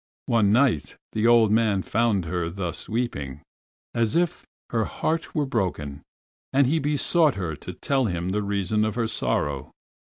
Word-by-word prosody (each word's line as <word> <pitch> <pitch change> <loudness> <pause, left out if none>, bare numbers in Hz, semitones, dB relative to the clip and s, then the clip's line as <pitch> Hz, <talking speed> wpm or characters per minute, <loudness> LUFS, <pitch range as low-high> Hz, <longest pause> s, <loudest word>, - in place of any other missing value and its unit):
One 110 -4 +3
night 120 - +2 0.2
the 110 +1 +1
old 115 -3 +6
man 110 -4 +2
found 110 -5 +1
her 85 0 -2
thus 90 -2 -5
weeping 75 - -3 0.5
as 115 -2 +1
if 175 0 0 0.2
her 115 -2 +1
heart 160 +1 -2
were 150 -2 +1
broken, 85 - -2 0.5
and 140 +1 +4
he 155 +6 +2
besought 150 +1 +2
her 85 -5 -3
to - - -8
tell 135 -2 0
him 90 -3 -2
the 105 +2 0
reason 100 +1 0
of 110 0 -1
her 120 -2 0
sorrow. 75 - -1
110 Hz, 160 wpm, -25 LUFS, 90-125 Hz, 0.5 s, old